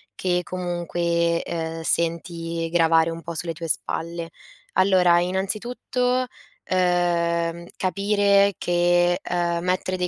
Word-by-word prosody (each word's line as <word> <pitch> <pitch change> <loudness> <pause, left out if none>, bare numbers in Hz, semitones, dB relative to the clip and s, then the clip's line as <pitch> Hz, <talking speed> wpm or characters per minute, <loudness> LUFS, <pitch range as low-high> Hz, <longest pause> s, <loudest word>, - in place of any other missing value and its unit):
che 180 -1 0
comunque, 170 -1 -1
ehm, 165 -1 -4
senti 165 0 -1
gravare 165 -1 +3
un 165 - -7
po' 170 0 -7
sulle 165 +1 -3
tue 165 +1 -6
spalle. 170 +1 -3 0.4
Allora, 185 -2 +4
innanzitutto, 240 +7 -1 0.5
uhm, 170 -2 +1
capire 200 +1 +3
che, 175 0 +2
ehm, 170 -1 -1
mettere 185 0 -1
dei 180 - -1
175 Hz, 105 wpm, -23 LUFS, 170-185 Hz, 0.5 s, Allora